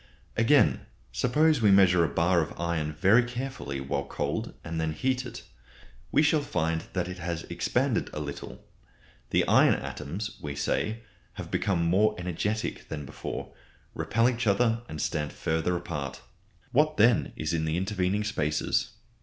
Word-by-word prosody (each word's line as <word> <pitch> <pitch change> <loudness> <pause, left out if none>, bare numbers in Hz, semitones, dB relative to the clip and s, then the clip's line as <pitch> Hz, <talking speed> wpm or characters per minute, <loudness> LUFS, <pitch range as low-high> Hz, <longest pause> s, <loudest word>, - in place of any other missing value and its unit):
Again, - - +3 0.2
suppose 150 - +2
we 105 - +5
measure 95 -3 +6
a 80 - +1
bar 85 +4 +2
of 75 - -5
iron 85 -3 -1
very 95 +10 +5
carefully 120 - -4
while 70 +1 -2
cold - - -3
and 85 -1 -3
then 80 -1 -1
heat 130 +8 -1
it. - - -9 0.7
We 150 - +4
shall 150 0 +3
find 80 - -1
that 90 -2 -1
it 90 0 -7
has 85 -1 -3
expanded - - 0
a - - -5
little. 70 -1 -7 0.6
The - - +2
iron - - +5
atoms, 105 +10 -5
we 75 -1 -5
say, 110 +10 -1 0.3
have - - -8
become 85 -4 +1
more 95 +6 +3
energetic 90 +5 -3
than 75 -2 -5
before, - - -6 0.4
repel 115 +2 +1
each 120 -2 -1
other 115 +3 +2
and 75 - -6
stand 75 0 -2
further 80 +2 0
apart. 70 -6 -5 0.5
What 155 +3 +2
then 115 +2 +4
is 75 +1 -2
in 80 -1 0
the 80 +1 0
intervening 95 +1 0
spaces? 75 -8 0
90 Hz, 155 wpm, -28 LUFS, 80-115 Hz, 0.7 s, measure